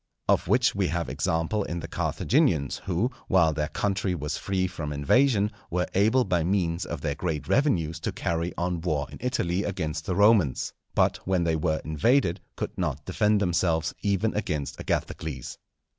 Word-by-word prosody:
Of - - +2
which - - +3
we - - +1
have - - -2
example 80 +6 0
in 85 -2 -4
the 80 - -6
Carthaginians, 80 - +1
who, 100 +7 0 0.2
while 85 -4 +4
their 75 0 -1
country 95 +1 -1
was 75 -2 -3
free 95 -1 -1
from 80 -5 -4
invasion, 105 - +3 0.2
were 90 +1 0
able 110 +7 +4
by 90 -6 +1
means 90 -1 0
of 85 -5 -5
their 75 -2 -1
great 75 0 -3
revenues 85 - +1
to - - -2
carry 85 +1 -2
on 85 -1 -1
war 75 -4 0
in - - -10
Italy 100 -7 0
against 80 -5 -3
the 90 - 0
Romans, 100 - +3 0.2
but - - +3
when 95 -2 +2
they 80 -1 +1
were 80 0 0
invaded 90 - +2
could - - -4
not - - -2
defend 105 0 +2
themselves 85 -4 +1
even 100 +2 +1
against 75 -9 -2
Agathocles. 70 -6 -3
90 Hz, 170 wpm, -26 LUFS, 80-100 Hz, 0.2 s, while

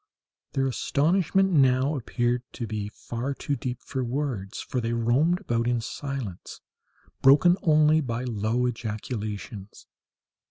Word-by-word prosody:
Their 135 - +1
astonishment 175 +8 +2
now 135 -1 +3
appeared 120 -1 -1
to 120 - -4
be 105 -2 -4
far 120 +5 -5
too 140 - -2
deep 125 -1 -4
for 130 -1 -3
words, 120 -6 -3
for 125 - -3
they 115 0 -1
roamed 130 - +2
about 120 - -1
in 120 -1 +1
silence, 125 -5 -6 0.6
broken 145 +6 +6
only 155 0 +4
by 120 -3 -3
low 115 +1 0
ejaculations. 110 -3 -5
125 Hz, 125 wpm, -26 LUFS, 115-140 Hz, 0.6 s, broken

